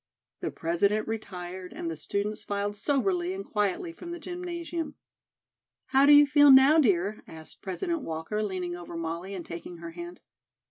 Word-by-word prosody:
The - - -2
President 200 +6 0
retired 185 -4 -6
and - - -5
the 165 - -3
students 205 +7 -3
filed 205 0 -2
soberly 345 - 0
and 390 - -6
quietly 210 - -1
from 345 - -10
the 345 0 -5
gymnasium. 345 -2 -5 0.9
"How 270 +1 +5
do - - +8
you 290 0 +9
feel 290 0 +6
now, 270 +4 +8
dear?" 205 - +2
asked 160 -1 -11
President 330 - -2
Walker, 165 +3 -3
leaning 185 -4 -3
over 175 -1 -8
Molly 170 +4 -4
and 175 -3 -6
taking 170 +1 -8
her 170 0 -8
hand. 175 +1 -8
205 Hz, 165 wpm, -28 LUFS, 175-290 Hz, 0.9 s, you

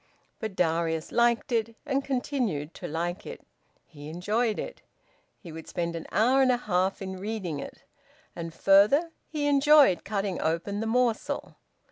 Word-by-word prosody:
But 220 -3 -5
Darius 165 -2 0
liked 235 +1 +2
it, 230 -1 0
and 275 -1 0
continued 245 - -2
to - - -7
like 170 +4 -3
it. 475 - -9 0.4
He 145 -1 -11
enjoyed 210 +7 0
it. - - -6 0.6
He 170 - -11
would 160 +1 -9
spend 170 -1 -3
an 165 - -6
hour 245 +7 +4
and 260 -1 +4
a 245 - +2
half 190 -3 0
in 190 0 -5
reading 190 -7 -4
it. - - -9 0.5
And 165 -1 -5
further, 205 - +4 0.2
he 300 -2 -3
enjoyed 290 - +5
cutting 200 -2 -2
open 170 +6 -1
the 225 - -2
morsel. 240 0 0
205 Hz, 155 wpm, -27 LUFS, 170-245 Hz, 0.6 s, enjoyed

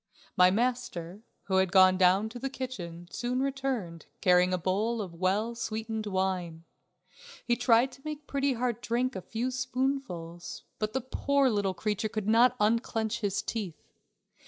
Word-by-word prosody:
My 180 0 +7
master, 210 -5 -2 0.2
who 190 -1 0
had 190 -1 +2
gone 185 -1 +7
down 185 +3 +4
to 245 - -8
the 270 +2 -2
kitchen, 175 -11 -6
soon 245 +5 -2
returned, 265 -11 -2
carrying 180 -1 +4
a 185 - +1
bowl 205 +7 0
of 190 -5 -5
well 195 +7 0
sweetened 220 -1 -4
wine. 185 -4 -2 0.8
He 240 - +2
tried 245 +1 +4
to 270 - -15
make 300 -1 -6
Pretty 280 -1 0
Heart 240 -1 -2
drink 245 +2 -1
a 190 - -4
few 235 +7 -3
spoonfuls, 250 -10 -3 0.2
but 215 0 -2
the 265 - 0
poor 275 +1 +1
little 200 -3 0
creature 215 +2 -1
could 215 -1 -3
not 235 +3 +5
unclench 225 +1 +1
his 200 -3 -1
teeth. 195 -9 -5
220 Hz, 155 wpm, -29 LUFS, 185-250 Hz, 0.8 s, My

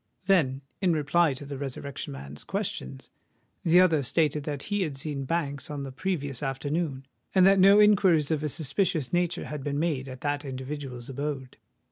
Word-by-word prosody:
Then, 150 -9 +2 0.2
in 180 -3 +3
reply 155 0 +2
to 145 - -8
the 140 -1 -6
Resurrection 140 0 -5
Man's 70 +1 -8
questions, 65 0 -4 0.5
the 170 +2 +5
other 165 -5 +4
stated 150 +2 +1
that 145 -2 -3
he 205 -1 -1
had 150 -7 -2
seen 140 -1 -3
Banks 145 -3 -2
on 145 -2 -4
the 135 - -6
previous 145 -3 -2
afternoon, 140 +1 -2 0.3
and 185 -1 +6
that 195 0 +6
no 195 +2 +7
inquiries 185 -8 +5
of 155 -2 +1
a 150 - -1
suspicious 160 +1 -1
nature 175 0 0
had 150 -2 -6
been 145 0 -2
made 150 -4 -1
at 130 -1 -9
that 145 0 -1
individual's 130 -2 -6
abode. 135 -1 -4
145 Hz, 175 wpm, -27 LUFS, 135-170 Hz, 0.5 s, no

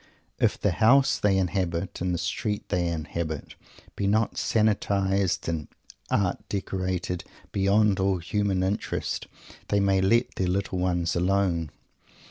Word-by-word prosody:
If - - +2
the 100 - +2
house 125 +8 +4
they 100 -2 +3
inhabit 90 -1 -1
and 90 0 0
the 90 - 0
street 100 +4 -3
they 90 -1 +1
inhabit 80 -1 -4 0.4
be 100 - -1
not 110 +2 +2
sanitarized 100 -3 +1
and 80 -3 -2 0.4
art 95 -3 +1
decorated 95 -3 -2 0.3
beyond 100 +1 +3
all 95 0 +2
human 95 +1 0
interest, 95 +3 -2 0.4
they 100 - +2
may 100 -1 +3
let 115 +6 +2
their 95 - 0
little 95 0 -1
ones 90 -2 0
alone. 90 -3 +1
95 Hz, 130 wpm, -26 LUFS, 90-100 Hz, 0.4 s, house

